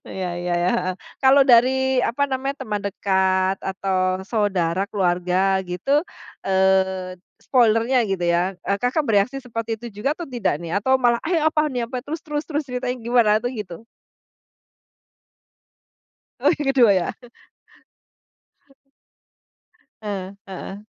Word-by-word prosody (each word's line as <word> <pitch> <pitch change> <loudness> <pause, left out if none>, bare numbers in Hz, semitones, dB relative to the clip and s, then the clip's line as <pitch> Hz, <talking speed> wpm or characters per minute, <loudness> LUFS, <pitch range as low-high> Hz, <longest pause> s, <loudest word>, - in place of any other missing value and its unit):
Iya 185 -1 -4
iya 175 0 -2
iya, 180 - +2
heeh. 185 -5 -2 0.3
Kalau 270 +1 +6
dari, 265 +1 +4
apa 250 +3 0
namanya, 270 +1 -3
teman 210 -1 -2
dekat 190 -1 +1
atau 190 -1 -1
saudara, 195 -3 0
keluarga, 185 0 +1
gitu, 275 +12 +1 0.4
eee, 190 -1 +1 0.2
spoiler-nya, 235 0 +3
gitu, 190 -2 -1
ya, 175 +2 +1
e 190 - -3
Kakak 255 +5 0
bereaksi 225 +2 +1
seperti 230 -2 -4
itu 240 - -10
juga 285 +7 0
atau 345 - -6
tidak, 220 - -1
nih? 170 -1 -6
Atau, 260 +5 +3
malah, 240 -2 +2
"Eh, 345 -3 +2
apaan 310 -1 +2
nih? 240 - 0
Apa? 250 0 -4
Terus 315 +2 -5
terus 300 -1 -3
terus, 300 -1 -2
ceritanya 250 0 -3
gimana?" 235 -3 +4
Atau, 245 +2 -3
gitu? 210 -4 -7 2.6
Oh, - - +1
yang 295 -2 -4
kedua, 245 -6 +5
ya? 180 -2 0 2.9
Eh, 195 -3 -5 0.2
heeh. 195 +1 -7
210 Hz, 130 wpm, -22 LUFS, 190-260 Hz, 2.9 s, Kalau